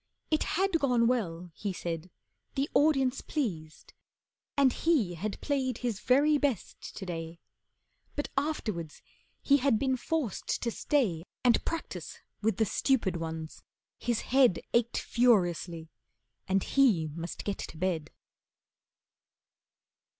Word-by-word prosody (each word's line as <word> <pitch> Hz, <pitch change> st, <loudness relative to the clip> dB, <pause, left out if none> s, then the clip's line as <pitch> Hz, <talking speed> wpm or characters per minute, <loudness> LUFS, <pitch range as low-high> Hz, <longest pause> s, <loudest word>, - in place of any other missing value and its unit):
It 310 Hz, -, +2 dB
had 385 Hz, -3 st, +2 dB
gone 250 Hz, -5 st, +3 dB
well, 180 Hz, -8 st, -1 dB
he 200 Hz, +3 st, -3 dB
said, 170 Hz, -1 st, -4 dB, 0.5 s
the 275 Hz, +1 st, +1 dB
audience 270 Hz, -4 st, +3 dB
pleased, 165 Hz, -, -4 dB, 0.6 s
And 270 Hz, -3 st, +5 dB
he 275 Hz, -, +2 dB
had 200 Hz, +5 st, -4 dB
played 265 Hz, -3 st, 0 dB
his 235 Hz, -5 st, -2 dB
very 290 Hz, +5 st, +4 dB
best 275 Hz, -9 st, -2 dB
to 195 Hz, -, -5 dB
day, 165 Hz, -1 st, -5 dB, 0.8 s
But 290 Hz, -, -2 dB
afterwards 215 Hz, -, -2 dB, 0.4 s
he 280 Hz, -, +5 dB
had 270 Hz, -4 st, +3 dB
been 260 Hz, +2 st, +1 dB
forced 270 Hz, -3 st, -2 dB
to 235 Hz, -, 0 dB
stay 215 Hz, -, 0 dB, 0.2 s
And 245 Hz, -2 st, +4 dB
practise 330 Hz, -, -4 dB, 0.2 s
with 220 Hz, +1 st, +1 dB
the 220 Hz, -, +3 dB
stupid 220 Hz, -3 st, +1 dB
ones. 160 Hz, -1 st, -5 dB, 0.4 s
His 240 Hz, -2 st, 0 dB
head 255 Hz, -8 st, +4 dB
Ached 235 Hz, 0 st, +2 dB
furiously, 175 Hz, -8 st, +1 dB, 0.6 s
and 190 Hz, 0 st, +2 dB
he 215 Hz, -, +3 dB
must 170 Hz, +2 st, -6 dB
get 200 Hz, -1 st, -3 dB
to -, -, -7 dB
bed. 165 Hz, -3 st, -1 dB
230 Hz, 125 wpm, -30 LUFS, 175-275 Hz, 0.8 s, And